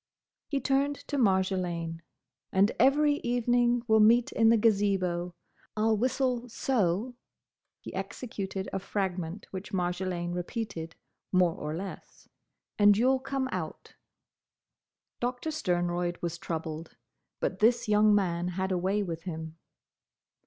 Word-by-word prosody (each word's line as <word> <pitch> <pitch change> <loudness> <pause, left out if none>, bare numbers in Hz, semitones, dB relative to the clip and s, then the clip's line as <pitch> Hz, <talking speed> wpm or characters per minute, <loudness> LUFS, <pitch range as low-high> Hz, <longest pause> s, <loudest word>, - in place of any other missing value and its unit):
He 280 - -1
turned 275 +1 +1
to 290 - -1
Marjolaine. 185 -5 0 0.5
"And 195 +3 +4
every 290 +3 +4
evening 245 -1 +1
we'll 220 -1 +5
meet 230 +3 +5
in 225 -1 +4
the 230 - +5
Gazebo. 195 -5 +1 0.4
I - - 0
'll 220 0 +4
whistle 250 +1 0
so:—" 225 -1 0 0.7
he - - -9
executed 195 -5 -5
a - - 0
fragment 185 -2 -3
which 190 +2 -7
Marjolaine 175 -1 -1
repeated, 175 -2 -4 0.4
more 180 -3 +4
or 150 0 -5
less—"and 200 +2 -1
you 250 +4 +4
'll 265 - +2
come 270 0 -2
out." - - -5 1.3
Doctor 250 +6 -2
Sternroyd 175 - -1
was 170 0 -4
troubled; 160 -3 -5 0.4
but - - -2
this 235 +2 +3
young 210 0 +5
man 175 -3 0
had 190 +1 -2
a 180 - +1
way 195 +3 +1
with 165 -2 -5
him. 160 -2 -6
195 Hz, 125 wpm, -29 LUFS, 175-240 Hz, 1.3 s, we'll